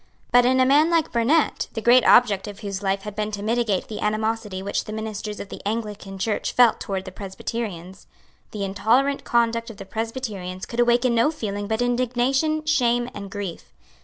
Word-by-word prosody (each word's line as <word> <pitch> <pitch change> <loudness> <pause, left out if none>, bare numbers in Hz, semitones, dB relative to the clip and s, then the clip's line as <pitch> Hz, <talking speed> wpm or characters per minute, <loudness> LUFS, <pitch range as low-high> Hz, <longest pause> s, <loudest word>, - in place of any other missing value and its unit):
But 245 0 +6
in 260 +1 +3
a 255 - +5
man 295 +5 +4
like 330 -2 +1
Burnet, 260 +7 +2
the 225 - -3
great 240 +3 +6
object 210 -5 +5
of 205 +1 -9
whose 200 -2 -4
life 195 0 -1
had 210 -1 -7
been 210 0 -2
to 205 0 -4
mitigate 225 -3 0
the 215 - -6
animosity 215 -2 -1
which 200 - -2
the - - -7
ministers 215 -1 -5
of 200 - -7
the - - -8
Anglican 210 -2 -4
Church 210 +2 -2
felt 245 -2 +5
towards 195 -3 -4
the 185 - -7
Presbyterians, 190 -1 -6 0.4
the 205 -2 -5
intolerant 230 +8 +1
conduct 230 0 +1
of 225 - -10
the 195 - -8
Presbyterians 210 -4 -5
could 235 - -6
awaken 240 +1 +3
no 230 +5 +3
feeling 205 -9 -4
but 220 +2 0
indignation, 255 +5 0
shame 245 -5 +1
and 200 -1 -7
grief. 200 -4 -6
220 Hz, 190 wpm, -23 LUFS, 200-245 Hz, 0.4 s, But